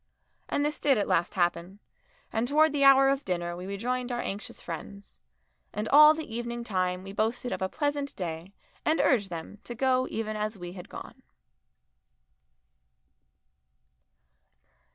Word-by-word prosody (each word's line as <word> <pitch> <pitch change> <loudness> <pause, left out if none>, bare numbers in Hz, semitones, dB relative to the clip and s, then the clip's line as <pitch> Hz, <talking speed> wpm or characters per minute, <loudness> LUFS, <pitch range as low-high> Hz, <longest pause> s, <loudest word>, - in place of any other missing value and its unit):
And 285 - +1
this 300 0 -2
did 280 -3 +3
at 205 - 0
last 170 - +1
happen, 175 +1 0 0.6
and 225 +2 0
towards 305 +2 +4
the 285 -1 +1
hour 270 0 +7
of 275 +1 +1
dinner 175 -2 -2
we 180 +2 -7
rejoined 245 +5 -2
our 240 - -2
anxious 205 -3 -5
friends, 200 - -8 0.5
and 210 +1 -3
all 300 +2 +8
the 315 0 -5
evening 235 0 -4
time 185 -4 -1
we 195 0 -8
boasted 225 +4 -1
of - - -3
a 190 - 0
pleasant 290 +1 -2
day 170 0 -5 0.3
and 315 +1 +2
urged 210 -8 +3
them 170 +4 -7
to 240 - -7
go 255 +1 +2
even 215 -1 -3
as 215 0 -3
we 175 -1 -7
had 180 -2 -10
gone. - - -10
220 Hz, 155 wpm, -28 LUFS, 185-270 Hz, 0.6 s, all